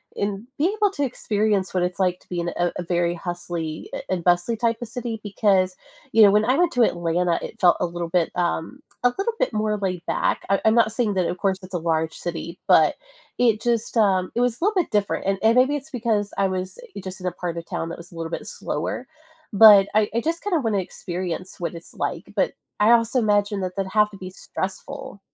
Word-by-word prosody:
and 205 +2 -3
being 340 +7 +2
able 415 -1 +4
to 285 - -2
experience 210 -6 0
what 180 -1 +1
it's 180 +1 -2
like 180 -1 +1
to - - -26
be 180 - -3
in 170 0 -1
a 175 0 +1
a 180 - -3
very 175 0 0
hustly 170 -2 -5
a - - -3
and 180 -2 -1
bustly 175 +6 +2
type 230 0 +1
of 240 - -4
city 230 -1 -5
because, 195 -3 +1 0.4
you 225 - +7
know, 200 - +8
when 210 +1 +3
I 255 +3 +3
went 350 0 +3
to 245 - +2
Atlanta, 175 -2 +1
it - - -8
felt 175 -2 +5
a - - +3
little 175 0 -4
bit, 170 -1 +1
um, 175 +7 -2 0.2
a 245 - +6
little 400 +4 0
bit - - 0
more 215 0 0
laid 185 -3 -3
back. - - 0
I 195 - +3
I'm 220 - +5
not 230 -2 +4
saying 225 -3 0
that, 180 -2 +1
of 180 - -3
course, 190 -1 0
it's 185 0 -12
a - - +2
large 160 -1 0
city, 170 0 -5
but - - +5 0.4
it 230 -3 +3
just, 235 -1 0
um, 190 -4 +3
it - - -1
was 245 -2 +1
a - - -5
little 420 - +3
bit - - -9
different, 205 -2 0
and 195 0 +1
and 225 +1 +5
maybe 260 +3 +4
it's 290 +2 -6
because 220 -4 -1
I 195 - +3
was 185 - -4 0.2
just 185 +1 -7
in 180 - -3
a 180 - 0
part 170 -2 -4
of 165 - -5
town 165 - -3
that - - -6
was 170 +1 -12
a - - -14
little 165 0 -5
bit - - -5
slower, 250 - -4 0.5
but 200 -1 +9
I 215 -1 +3
I 235 - +2
just 330 +4 -2
kinda 375 -5 +1
wanna 220 -5 0
experience 180 0 -5
what 175 0 -3
it's 170 - -11
like, - - -4
but - - +1 0.3
I 210 +2 +5
also 230 +1 +3
imagine 205 -2 +1
that 185 -1 -4
that'd 195 -1 -3
have 210 -1 +4
to 200 - -11
be 185 -1 -7
stressful. 235 +7 -6
195 Hz, 240 wpm, -23 LUFS, 180-230 Hz, 0.5 s, but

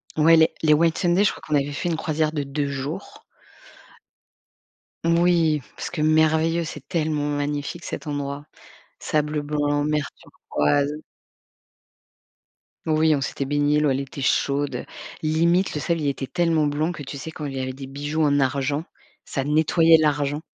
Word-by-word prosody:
Ouais 160 +2 +6
les 160 0 +5
les 155 -1 +5
Whitsunday, 170 +4 +2
je - - +3
crois - - -11
qu'on 150 - 0
avait 145 0 +1
fait 175 - -2
une 165 - 0
croisière 155 -1 0
de 150 -2 -2
2 140 +1 -2
jours. 140 +7 -6 1.8
Moui, 170 -3 +3
parce - - -5
que 165 -3 -3
merveilleux, 160 +2 +3
c'est 150 -3 -8
tellement 155 -4 -1
magnifique 145 +3 -3
cet - - -6
endroit, 145 0 -4 0.5
sable 150 0 -1
blanc, 145 0 0
mer 150 -1 0
turquoise 140 - -1 1.9
Oui, 155 0 +3
on 140 - -2
s'était 135 +1 -3
baignés, 145 +1 +2
l'eau, 150 -1 +2
elle 135 0 +1
était 140 0 -6
chaude. 140 +1 0 0.4
Limite, 170 +4 +2
le 150 - -3
sable, 170 +2 0
il 145 - -1
était 135 -1 -2
tellement 165 -3 +1
blanc 150 +3 0
que, 165 -4 -7
tu 140 +1 -7
sais, 160 +4 -7
quand 155 -1 -7
il 140 - -5
y - - -3
avait 130 0 -3
des 135 0 -9
bijoux 145 +3 -2
en 145 -1 +3
argent, 140 +3 0 0.4
ça 135 - -3
nettoyait 160 +3 +4
l'argent. 145 -1 0
150 Hz, 165 wpm, -23 LUFS, 145-160 Hz, 1.9 s, Ouais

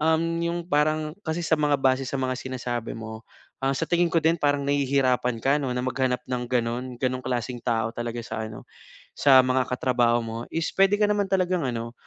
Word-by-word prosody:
um, 160 +1 +3 0.2
yung 170 +1 -1
parang 155 0 +1 0.2
kasi 160 +2 -1
sa 160 -1 +1
mga 150 -1 +2
base 130 0 +2
sa 130 - -5
mga 130 -1 -1
sinasabi 125 -3 -4
mo 110 0 -8 0.3
sa 135 +2 -1
tingin 175 0 +3
ko 165 - +2
din 165 +1 +3
parang 145 -1 +1
nahihirapan 135 -3 +1
ka 140 +2 +3
'no 130 -4 -2
na 125 - -1
maghanap 125 -1 -1
ng 125 -1 -2
ganun, 120 0 -1 0.2
ganong 130 0 -1
klaseng 125 -1 -2
tao 115 -2 0
talaga 120 0 -5
sa 110 -1 -4
ano, 110 0 -9 0.5
sa 135 -2 +6
mga 130 0 +1
katrabaho 120 -2 +2
mo 115 0 -5 0.2
is 165 0 0
pwede 195 +1 +5
ka 210 - +3
naman 205 -1 +1
talagang 185 -5 +1
ano 115 -1 -4
130 Hz, 195 wpm, -25 LUFS, 120-155 Hz, 0.5 s, sa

